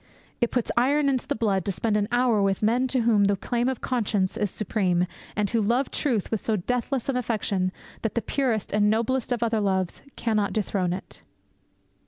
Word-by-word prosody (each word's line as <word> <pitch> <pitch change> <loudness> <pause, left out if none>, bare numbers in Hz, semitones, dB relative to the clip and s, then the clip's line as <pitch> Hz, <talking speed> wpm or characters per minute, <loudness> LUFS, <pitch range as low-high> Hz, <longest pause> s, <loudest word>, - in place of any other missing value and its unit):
It 240 - +3
puts 245 -3 -1
iron 280 +4 +3
into 260 -3 -1
the - - 0
blood 200 -4 +1
to 200 - 0
spend 210 +3 0
an 205 -1 +1
hour 240 -3 +3
with 195 +1 +1
men 240 +4 +3
to 255 -1 +1
whom 220 -3 +4
the 200 0 +3
claim 240 +5 -1
of 260 - -3
conscience 210 -6 0
is 210 -3 0
supreme, 185 -3 0 0.3
and 210 0 +1
who 230 -2 +2
love 240 +6 +1
truth 240 - -1
with 220 - -1
so 220 - +1
deathless 250 +6 -2
an 270 -2 0
affection 205 -6 -1 0.3
that 225 - -2
the 235 - +1
purest 240 -6 -1
and 210 0 +3
noblest 235 +4 0
of 240 -1 +1
other 225 -2 +1
loves 190 -3 0
cannot 215 -3 0
dethrone 195 -4 0
it. 185 - -8
220 Hz, 200 wpm, -25 LUFS, 200-245 Hz, 0.3 s, whom